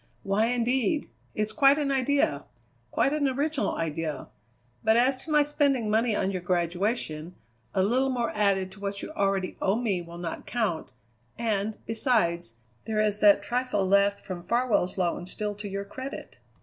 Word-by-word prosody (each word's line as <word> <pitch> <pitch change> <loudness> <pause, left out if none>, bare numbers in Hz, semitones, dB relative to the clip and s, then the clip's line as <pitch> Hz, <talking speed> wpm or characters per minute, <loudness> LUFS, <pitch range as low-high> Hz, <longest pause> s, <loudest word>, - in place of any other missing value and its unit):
"Why, 200 +3 +2
indeed? 250 +5 0 0.2
It's 215 0 0
quite 280 -1 +5
an 290 -2 0
idea. 265 - +1 0.4
Quite 275 - +1
an 295 -2 +1
original 285 +3 0
idea. 160 -3 -3 0.5
But 220 +1 +4
as 255 +3 +4
to 310 +4 -7
my 300 -1 +5
spending 280 -6 +1
money 225 0 +2
on 195 - 0
your 185 -2 -3
graduation, 175 -1 -1 0.4
a 190 - +3
little 255 +6 +2
more 245 -2 -1
added 195 -3 +1
to 195 - -14
what 200 0 -4
you - - -6
already 195 -8 -1
owe 195 - +2
me 215 -6 0
will 170 0 -10
not 170 -1 -6
count, 205 - -1 0.5
and, 215 -2 -1
besides, 195 - 0 0.3
there 220 -1 -1
is 210 -1 +1
that 205 -1 +6
trifle 245 -4 0
left 200 +1 +3
from 185 -3 -6
Farwell's 215 -2 +1
loan 175 -1 -1
still 210 +2 -3
to 205 0 -7
your 200 0 -4
credit." 260 +6 -8
210 Hz, 165 wpm, -27 LUFS, 190-250 Hz, 0.5 s, that